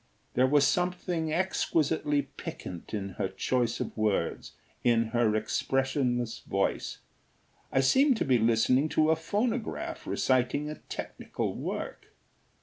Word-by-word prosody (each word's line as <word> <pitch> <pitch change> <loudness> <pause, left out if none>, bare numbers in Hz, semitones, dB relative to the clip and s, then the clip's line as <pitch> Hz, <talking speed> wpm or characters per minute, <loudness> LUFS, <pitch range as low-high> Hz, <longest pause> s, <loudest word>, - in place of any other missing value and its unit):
There 130 +1 +4
was 145 +1 +4
something 180 -2 0
exquisitely 155 -4 +1
piquant 90 -9 -8
in 100 -2 -3
her 100 - +1
choice 120 +2 0
of - - -4
words, 110 -2 -1 0.3
in 115 -2 +3
her 115 -2 +2
expressionless 125 +1 0
voice. - - -1 0.7
I 135 - +3
seemed 260 - +4
to - - 0
be 130 -3 +3
listening 115 +6 +3
to 155 0 +5
a - - +4
phonograph 230 - -2
reciting 130 +3 +1
a 155 - -8
technical - - -4
work. - - -5
135 Hz, 125 wpm, -29 LUFS, 120-160 Hz, 0.7 s, to